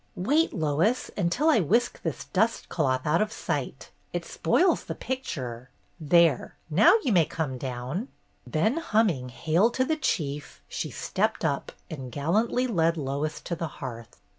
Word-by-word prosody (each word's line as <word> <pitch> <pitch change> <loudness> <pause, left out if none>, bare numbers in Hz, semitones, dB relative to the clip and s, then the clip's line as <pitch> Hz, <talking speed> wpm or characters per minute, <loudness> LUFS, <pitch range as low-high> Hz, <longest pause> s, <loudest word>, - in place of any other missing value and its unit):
"Wait, 290 - +2
Lois, 165 - 0
until 210 - +1
I 310 -8 +5
whisk 230 +8 +1
this 140 -6 -3
dust 220 +10 0
cloth 130 -5 0
out 155 +4 +3
of 215 0 0
sight. - - -4 0.2
It - - -3
spoils 360 -1 +2
the - - -5
picture. 130 - -5 0.3
There, 165 -2 +3 0.2
now 305 - +6
you 260 - +1
may 170 -4 +5
come 150 -5 -3
down!" 130 - -4 0.4
Then 205 - +1
humming 210 - +1
"Hail 165 - +2
to 260 +2 0
the 315 +3 0
Chief!" 145 - -2
she - - -4
stepped - - -1
up - - -1 0.2
and 135 -5 -7
gallantly 215 - +1
led 170 -8 +1
Lois 145 +2 -2
to 170 - -4
the 165 0 -3
hearth. 115 -4 -8
165 Hz, 155 wpm, -27 LUFS, 140-230 Hz, 0.4 s, now